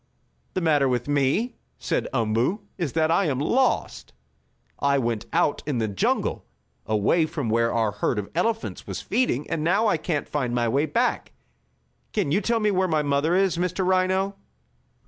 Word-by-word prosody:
"The 185 - 0
matter 145 -5 +3
with 125 0 -1
me," 145 - +1 0.2
said - - -1
Umboo, 120 - 0
"is 170 -7 -3
that 160 0 +2
I 190 +4 +3
am 140 -5 0
lost. 240 - 0 0.7
I 140 0 +2
went 115 -4 -2
out 145 - +1
in 145 -4 -1
the 110 -1 0
jungle, 100 -2 -1 0.4
away 110 - +2
from 145 -7 -3
where 115 +1 +2
our 110 -2 +1
herd - - -1
of 100 -1 -3
elephants 225 +6 -2
was - - -4
feeding, 150 - 0
and 155 -2 -2
now 195 +7 +2
I 210 - +3
can't 155 -1 -2
find 125 -5 -2
my 120 -1 +1
way 140 +7 +1
back 145 - 0
again. - - -29 0.8
Can 140 - 0
you 195 +7 +2
tell 230 +3 +1
me 210 -1 +2
where 190 -1 +1
my 155 -3 +1
mother 145 +4 +1
is, 190 -2 +2
Mr. 180 +1 -1
Rhino?" 185 +1 +1
150 Hz, 180 wpm, -24 LUFS, 125-185 Hz, 0.8 s, matter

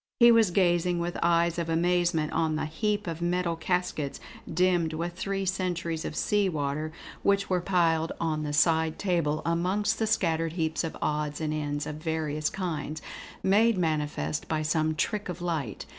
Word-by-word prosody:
He 235 -1 +8
was 225 -4 +5
gazing 175 -1 +2
with 175 +1 -2
eyes 170 0 +2
of 165 -1 -2
amazement 170 -1 +1
on 160 -1 +1
the 155 - -1
heap 205 +7 -1
of 165 -1 -5
metal 175 0 0
caskets, 175 -4 -2 0.3
dimmed 175 -1 +2
with 170 +2 -3
three 195 +2 -2
centuries 175 -3 -2
of - - -4
sea 205 -2 +2
water, 150 -1 -2 0.3
which 200 -1 +1
were 180 -1 +2
piled 165 -3 +2
on 155 -2 -1
the 150 -1 -3
side 160 +1 +2
table 170 -6 0
amongst 190 +6 +1
the 220 - +1
scattered 165 -6 +1
heaps 160 -1 -1
of 165 - -4
odds 150 -1 -1
and 155 -1 -1
ends 145 -1 -2
of 150 - -5
various 155 -2 -1
kinds, 160 -4 -4 0.4
made 210 +3 +4
manifest 155 -3 -1
by 155 -1 -1
some 155 0 +1
trick 205 +6 -1
of 180 -1 -5
light. 160 - -3
170 Hz, 170 wpm, -28 LUFS, 155-180 Hz, 0.4 s, He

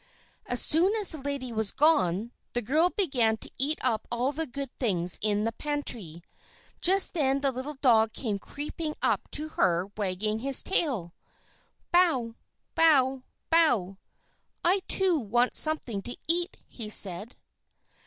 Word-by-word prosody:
As 245 - +1
soon 360 +7 +3
as 420 -3 +2
the 315 - -1
lady 270 -3 -5
was 220 -2 +1
gone, 225 - +1 0.2
the 245 - -1
girl 310 +10 +2
began 255 - 0
to - - -8
eat 290 +4 +1
up 230 -4 -1
all 245 +3 -1
the 320 +2 -4
good 275 0 -7
things 180 -8 +1
in 210 0 +1
the 225 - -1
pantry. 230 - -5 0.6
Just 380 +2 +3
then 275 -4 0
the 275 -1 +1
little 260 +4 -6
dog 225 -4 +4
came 215 -5 -4
creeping 300 +5 -6
up - - 0
to 305 +1 0
her, 180 - 0
wagging 210 +2 -2
his 270 +2 +3
tail. 245 - 0 0.8
"Bow! 315 -11 +2 0.4
Bow! 270 -5 +3 0.3
Bow! 235 - +2 0.7
I, 375 +3 +3
too, 370 -4 +4
want 240 +1 0
something 280 -10 +3
to 240 +5 -6
eat," 345 +3 0
he 220 -3 -7
said. 205 +2 +1
255 Hz, 145 wpm, -27 LUFS, 215-310 Hz, 0.8 s, dog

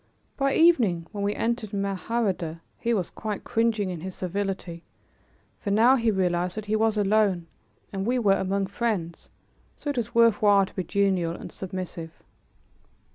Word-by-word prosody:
By 275 -1 +1
evening, 235 - +4
when 200 -1 -4
we 205 +1 0
entered 225 -3 -2
Mahardeh, 195 -4 -1 0.2
he 235 - -1
was 195 -7 0
quite 215 -2 -5
cringing 225 -4 0
in 170 -3 -6
his 185 +1 -6
servility, 185 -2 -3 0.8
for 205 - -4
now 225 +6 +5
he 230 -3 +1
realized 180 -2 0
that 215 - -4
he 215 +1 0
was 220 0 +2
alone 200 -4 +2 0.5
and 195 -1 -2
we 245 +5 +1
were 210 -5 +4
among 195 0 0
friends, 195 -4 -3 0.5
so 290 - -3
it 280 - -7
was 235 -2 -3
worth 230 -2 +5
while 200 -2 +5
to - - -15
be 185 - -1
genial 185 -2 +1
and - - -9
submissive. 185 -3 -6
200 Hz, 165 wpm, -26 LUFS, 185-225 Hz, 0.8 s, now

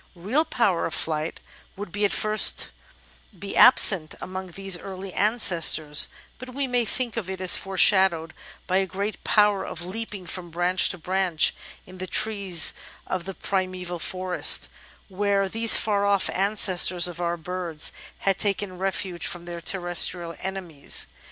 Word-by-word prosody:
Real 220 - -1
power 200 - -1
of 160 - -5
flight 155 0 -3 0.4
would 200 -2 -8
at 205 -1 0
first 215 0 +2 0.7
be 200 +2 -8
absent 195 -10 +5
among 185 0 -7
these 195 +1 0
early 190 +1 -7
ancestors, 170 -8 +3 0.3
but 255 +1 -11
we 280 0 -2
may 245 -2 -1
think 240 0 -3
of 195 -5 -5
it 190 -1 -6
as 185 -1 +6
foreshadowed 190 -3 +2 0.3
by 185 - 0
a 190 0 0
great 200 +2 -6
power 210 -2 +2
of 175 +1 -6
leaping 205 0 -7
from 175 0 -7
branch 175 +2 +1
to 180 - -6
branch 180 -1 +1 0.3
in 185 0 -14
the 185 - -5
trees 200 -5 +1 0.3
of 185 -2 -5
the 195 -1 -7
primeval 185 -2 -4
forest, 185 +1 +3 0.4
where 200 0 -1
these 225 +3 +6
far 205 -2 0
off 200 -1 +1
ancestors 185 -3 +2
of 175 0 -8
our 170 0 -2
birds 170 -2 -2 0.3
had 195 -1 -1
taken 195 -2 -2
refuge 190 -2 -3
from 175 -1 -6
their 170 -1 -8
terrestrial 175 -1 0
enemies. 180 -6 -2
185 Hz, 150 wpm, -23 LUFS, 175-200 Hz, 0.7 s, as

